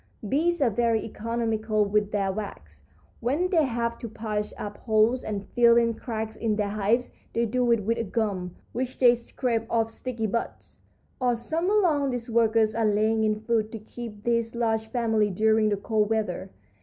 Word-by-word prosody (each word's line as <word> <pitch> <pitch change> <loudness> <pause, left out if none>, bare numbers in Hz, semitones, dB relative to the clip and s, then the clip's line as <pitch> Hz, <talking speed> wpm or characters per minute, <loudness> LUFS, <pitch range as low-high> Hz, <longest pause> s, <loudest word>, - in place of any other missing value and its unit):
Bees 330 - +1
are 240 - +3
very 230 +1 +1
economical 220 -1 -1
with 205 0 +1
their 195 -2 0
wax. 80 - -7 0.4
When 295 +10 0
they 325 -5 +4
have 235 -2 -2
to 230 - -6
patch 210 -1 -3
up 205 0 -6
holes 220 +3 +2
and 205 -2 -4
fill 235 -1 +5
in 230 -1 +3
cracks 220 -2 -5
in 220 -2 0
their 205 -1 -1
hives 215 +4 0 0.2
they 235 - +1
do 245 +1 +1
it 230 -3 +2
with 230 +3 0
a - - 0
gum 195 -4 -2 0.2
which 255 +1 -3
they 245 -2 +6
scrape 235 -1 -2
off 225 -1 +1
sticky 230 -1 -4
buds. 225 +2 -4 0.4
"All 245 -1 +2
summer 330 - -1
long 305 -9 +3
these 245 -2 -4
workers 225 -1 +3
are 225 0 +1
laying 215 +1 +2
in 215 0 0
food 220 -1 0
to - - -3
keep 215 -1 -9
this 230 -1 0
large 225 -2 0
family 220 -3 +1
during 220 +2 +3
the 205 - 0
cold 210 +1 0
weather. 210 -4 -1
225 Hz, 180 wpm, -26 LUFS, 215-235 Hz, 0.4 s, they